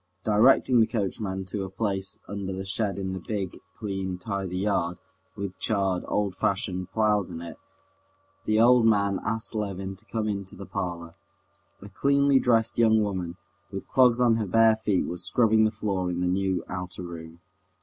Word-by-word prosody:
Directing 120 +3 +4
the 110 - +5
coachman 95 -3 -3
to 95 +1 -4
a 95 - -5
place 95 -1 -2
under 100 -1 -4
the 95 0 -5
shed 100 0 -2
in 95 -1 -3
the 95 - -4
big, 95 -1 -4 0.2
clean, 95 -3 -4
tidy 95 -1 -4
yard, 90 -3 0 0.4
with 100 -2 -6
charred, 95 -4 0
old 100 -3 -1
fashioned 95 -1 -1
ploughs 105 -3 +2
in - - -6
it, 85 -2 -8 0.9
the 110 0 +2
old 120 +1 +6
man 100 -3 +2
asked 115 0 -2
Levin 95 -3 -3
to 110 - -19
come 110 -2 -2
into 100 -2 -4
the 100 - -8
parlor. 85 -3 -4 0.7
A 100 - -10
cleanly 140 +5 +3
dressed 115 -2 +2
young 110 -2 +5
woman, 90 -4 -3 0.3
with - - -6
clogs 125 -2 +4
on 120 -2 +4
her 110 -3 -2
bare 115 +3 +5
feet, 105 -4 0
was 90 +1 -4
scrubbing 110 -2 +3
the - - +3
floor 100 -4 -2
in 90 0 -2
the 90 - 0
new 95 -1 0
outer 90 0 -6
room. 85 -1 -9
100 Hz, 175 wpm, -26 LUFS, 95-110 Hz, 0.9 s, old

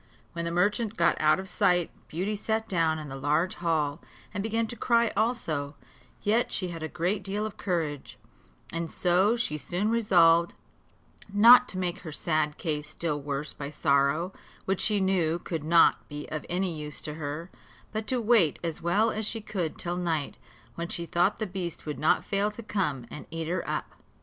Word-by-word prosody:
When 170 0 -3
the 170 - -2
merchant 210 +5 +1
got 170 0 +4
out 155 +3 +4
of 190 - -6
sight, 175 -1 +2 0.2
Beauty 190 +6 -2
sat 220 +2 -1
down 165 -5 +1
in 155 -1 -6
the 135 - -7
large 150 +6 +1
hall, 160 -3 0 0.3
and 200 - -2
began 225 +2 0
to 225 - -6
cry 235 -1 +2
also; 160 - -1 0.5
yet 225 +4 +2
she 185 - -1
had 165 -2 -6
a 160 - -2
great 180 +6 -1
deal 200 +3 -2
of 215 - -5
courage, 160 -7 -3 0.6
and 165 -1 -3
so 185 +5 +3
she 150 -11 -2
soon 185 +9 -1
resolved 170 -7 +4 0.8
not 235 +5 +8
to 185 - -3
make 180 -2 -2
her 160 - -8
sad 155 -1 0
case 150 -2 -3
still 155 -2 -2
worse 140 +1 -3
by 140 -1 -6
sorrow, 145 +5 +1 0.3
which 190 -1 0
she 210 -2 +3
knew 180 -4 +2
could 165 -3 -4
not 165 +2 +4
be 145 0 -6
of 155 - -4
any 180 -1 -1
use 150 -1 -7
to 150 - -3
her, 155 +3 -5 0.4
but 220 0 -4
to 255 +1 +1
wait 220 -9 +4
as 165 -2 -3
well 205 +7 +2
as 215 0 -2
she 225 - -2
could 185 -6 -3
till 175 0 -2
night, 165 -5 -1 0.4
when 170 0 -4
she 170 0 -2
thought 175 +4 +2
the 215 - -2
beast 180 -4 -5
would 150 -1 -4
not 155 - +2
fail 200 +1 +1
to 215 +2 -9
come 150 - -1
and 150 - -8
eat 165 0 -4
her 180 +2 -1
up. - - -3
175 Hz, 190 wpm, -28 LUFS, 155-205 Hz, 0.8 s, not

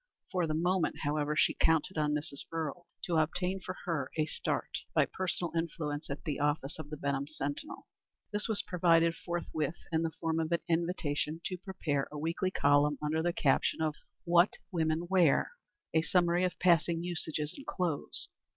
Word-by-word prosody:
For 180 -3 +1
the 155 - 0
moment, 180 +2 +1
however, 150 0 0
she - - +4
counted 160 +3 +2
on 150 -1 +1
Mrs. 150 -2 -4
Earle 165 +1 -4 0.2
to 170 -2 0
obtain 180 +4 0
for 185 0 -6
her 155 -7 -1
a 155 - +3
start - - -2 0.2
by - - +5
personal 180 -2 -2
influence 160 -2 -2
at 140 - -5
the 150 -4 -2
office 145 0 0
of 150 -2 -7
the 150 - -5
Benham 140 0 -1
Sentinel. 145 - -5 0.5
This 210 0 +2
was 220 -3 +1
provided 170 -2 +3
forthwith 170 -2 -3 0.2
in 160 -1 +2
the 165 - 0
form 165 -1 0
of 160 0 -1
an 170 - +2
invitation 165 -2 0
to 185 - -2
prepare 155 -7 -2
a 150 - -6
weekly 165 +5 -1
column 145 -3 +3
under 155 +1 0
the 175 +1 +1
caption - - +2
of 155 -1 +1 0.3
"What 175 +2 +5 0.2
Women 160 -1 0
Wear;" 175 -6 +4 0.4
a 160 - +4
summary 175 +1 +3
of 180 - -2
passing 170 -1 +3
usages 160 -3 -2
in 275 - -9
clothes. 175 -6 0
165 Hz, 175 wpm, -32 LUFS, 150-175 Hz, 0.5 s, by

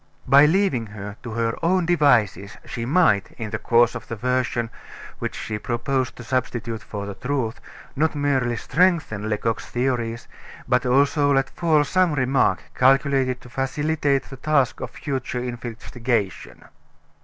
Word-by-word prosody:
By 140 +3 +7
leaving 160 - +1
her 105 -1 -8
to 120 - -7
her 115 0 0
own 180 +1 +2
devices 120 - +2
she 115 0 -5
might, 145 - +3
in 110 -3 -6
the 110 - -2
course 120 0 +3
of 115 -3 -8
the 115 - -4
version 125 0 -1 0.5
which - - -4
she 105 -1 -4
proposed 125 +3 -1
to 125 - -10
substitute 120 -2 -2
for 100 +1 -6
the 100 - -5
truth, 125 0 -3 0.3
not 155 +2 +1
merely 135 -4 +1
strengthen 155 - +1
Lecoq's 110 +1 -2
theories, 120 -2 -2 0.4
but 125 0 +2
also 145 +3 +3
let 135 -1 +1
fall 160 -3 +2
some 180 +2 +2
remark 130 -7 +2
calculated 135 -1 +2
to 125 - -13
facilitate 140 +2 0
the 135 - -11
task 140 -2 +1
of - - -5
future 135 -4 -4
investigation. 120 -3 -4
125 Hz, 145 wpm, -23 LUFS, 115-140 Hz, 0.5 s, By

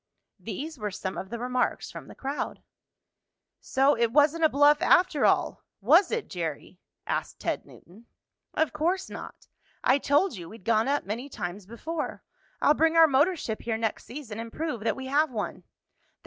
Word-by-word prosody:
These 260 - -6
were 210 -1 -2
some 190 -1 -5
of 190 - -6
the 235 - -4
remarks 250 +1 -1
from - - -9
the - - -12
crowd. 275 +2 -4 1.0
"So, 270 +2 +2
it 230 -1 +1
wasn't 300 +4 +3
a 315 - +6
bluff 290 +1 +5
after 360 -5 +4
all; - - +1 0.2
was 325 - +5
it, 465 -1 -2
Jerry?" 170 +1 -5 0.3
asked - - -3
Ted - - -2
Newton. 215 +7 -17 0.5
"Of 315 - +1
course 345 +5 -1
not. - - -9 0.4
I 265 +2 +4
told 290 +6 +2
you 170 -2 -8
we'd 220 -4 -13
gone 225 0 +3
up 285 +1 0
many 235 +7 -4
times 185 -4 -6
before. 305 +8 -5 0.4
I'll 295 - +6
bring 320 +2 +2
our 330 0 +9
motor 300 +5 +3
ship 220 -8 -4
here 225 -1 -2
next 225 -1 -2
season, 240 -5 -7
and 230 0 -6
prove 310 -5 -3
that 225 - +1
we 265 - -7
have 290 +4 +2
one." 220 -5 -5
265 Hz, 175 wpm, -27 LUFS, 220-305 Hz, 1.0 s, our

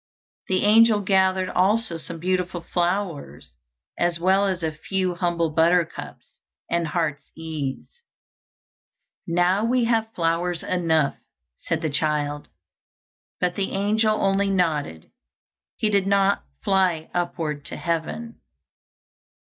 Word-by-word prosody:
The 185 -1 +1
angel 215 0 +5
gathered 190 -1 +2
also 195 -1 +1
some 165 +1 -7
beautiful 180 0 -1
flowers, 175 - -2 0.5
as 175 -1 +1
well 190 +3 +3
as 185 -3 -2
a 160 - 0
few 185 +4 -2
humble 170 -2 0
buttercups 165 +2 0 0.4
and 170 -1 0
heart's 150 -3 -2
ease. 160 - -6 1.3
"Now 175 +4 +2
we 245 +2 +2
have 225 -1 +1
flowers 170 +1 0
enough," 160 -5 +1 0.4
said - - -3
the 160 - 0
child; 145 -1 -1 0.9
but 180 -1 +1
the 195 0 -3
angel 215 +2 +2
only 195 +1 +2
nodded, 155 - -1 0.6
he 220 - 0
did 200 -1 +2
not 200 - +2 0.2
fly 185 -5 +1
upward 165 -4 -2
to - - -5
heaven. 170 +8 -3
180 Hz, 115 wpm, -24 LUFS, 165-195 Hz, 1.3 s, angel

